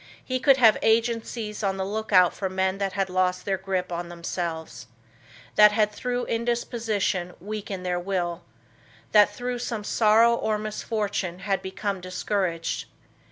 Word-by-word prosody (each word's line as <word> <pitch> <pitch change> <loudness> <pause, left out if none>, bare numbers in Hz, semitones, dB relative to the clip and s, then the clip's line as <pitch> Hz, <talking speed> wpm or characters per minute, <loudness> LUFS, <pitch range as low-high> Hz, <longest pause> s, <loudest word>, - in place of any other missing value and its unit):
He 255 0 -1
could 275 0 +5
have 225 -4 +6
agencies 225 -1 0
on 195 -2 0
the 190 - -2
lookout 200 -3 +3
for 190 - -3
men 190 +1 -1
that 195 -1 -1
had 195 -1 0
lost 185 0 0
their 195 -2 -1
grip 190 -2 -2
on 170 0 -4
themselves; 165 -7 -5 0.7
that 210 0 +8
had 210 -1 +2
through 245 +3 -3
indisposition 225 -6 -1
weakened 200 -2 -5
their 180 -1 0
will; 175 -2 -2 0.7
that 210 -1 +6
through 245 +3 -4
some 230 -3 -3
sorrow 225 +2 +4
or 220 -2 0
misfortune 210 -3 -3
had 195 -2 0
become 195 0 -4
discouraged. 185 -2 -2
200 Hz, 145 wpm, -25 LUFS, 185-220 Hz, 0.7 s, that